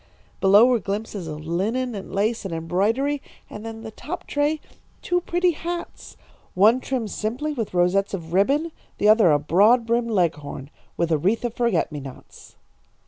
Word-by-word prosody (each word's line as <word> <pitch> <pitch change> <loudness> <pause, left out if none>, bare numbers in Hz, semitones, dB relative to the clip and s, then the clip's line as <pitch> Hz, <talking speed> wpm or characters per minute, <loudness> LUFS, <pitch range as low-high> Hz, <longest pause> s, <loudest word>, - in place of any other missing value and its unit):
Below 200 +4 +6
were 250 -2 +3
glimpses 200 -2 -4
of 155 0 -7
linen 225 +10 -1
and 195 -2 -7
lace 215 +3 0
and 195 - -5
embroidery, 210 - 0 0.3
and 210 +2 -7
in 225 0 -8
the 220 - -7
top 350 +10 -7
tray 295 +2 0 0.4
two 355 0 +1
pretty 355 +1 +1
hats. 340 +2 -6 0.4
One 215 +7 +5
trimmed 250 -5 -3
simply 250 +8 -3
with 225 -8 -4
rosettes 190 +3 +2
of 165 -2 -8
ribbon, 280 - +2 0.3
the 210 - +2
other 215 -5 +6
a 145 - +5
broad 205 - +4
brimmed 235 0 0
leghorn 155 -8 -2 0.3
with 170 -1 0
a 155 - +2
wreath 215 +9 0
of 235 - -2
forget 235 -11 0
me 150 - -5
nots. 135 -2 -12
215 Hz, 170 wpm, -23 LUFS, 180-250 Hz, 0.4 s, Below